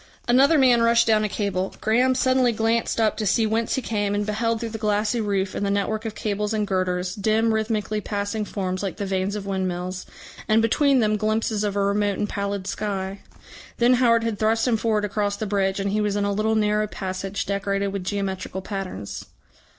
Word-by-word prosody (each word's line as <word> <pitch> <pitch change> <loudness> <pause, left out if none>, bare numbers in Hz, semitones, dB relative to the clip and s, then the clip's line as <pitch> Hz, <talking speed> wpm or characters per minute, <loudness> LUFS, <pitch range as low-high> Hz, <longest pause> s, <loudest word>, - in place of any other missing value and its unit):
Another 270 +6 +5
man 250 -4 +5
rushed 230 0 +4
down 215 -2 +3
a 210 - 0
cable. 195 -2 -2
Graham 250 +4 +2
suddenly 255 -1 +3
glanced 225 +1 0
up 220 -1 +2
to 215 - -2
see 225 +3 +3
whence 220 +1 0
he 265 - -2
came, 205 -2 -1
and 205 0 -1
beheld 225 +2 -1
through 230 -1 -4
the 225 - -5
glassy 210 +2 0
roof 195 -2 -1
and - - -3
the 200 - 0
network 210 +2 -1
of 220 -1 -4
cables 210 0 -2
and 210 -1 0
girders, 185 -2 -1
dim 220 +3 +1
rhythmically 215 -1 -1
passing 205 +1 -2
forms 185 -3 -3
like 195 -2 -4
the 205 - -3
vanes 190 +1 -1
of 205 -2 -5
windmills, 185 -1 -3 0.4
and 215 +1 +4
between 265 +4 +3
them 215 -1 +2
glimpses 215 0 0
of 205 -1 -1
a 200 - +1
remote 205 0 +1
and 210 - -2
pallid 200 -1 -3
sky. 195 -1 -3 0.6
Then 240 +1 +4
Howard 235 -2 +4
had 225 -3 -2
thrust 225 +2 +2
him 240 - +3
forward 215 -2 0
across 205 0 -1
the 215 - -4
bridge, 195 -1 0
and 195 0 -1
he 210 +1 +1
was 205 -1 0
in 205 -1 0
a 200 - 0
little 215 +2 +1
narrow 210 0 +1
passage 190 0 -4
decorated 200 0 -1
with 195 -1 -4
geometrical 190 -1 -3
patterns. 190 - -5
210 Hz, 205 wpm, -24 LUFS, 200-225 Hz, 0.6 s, Another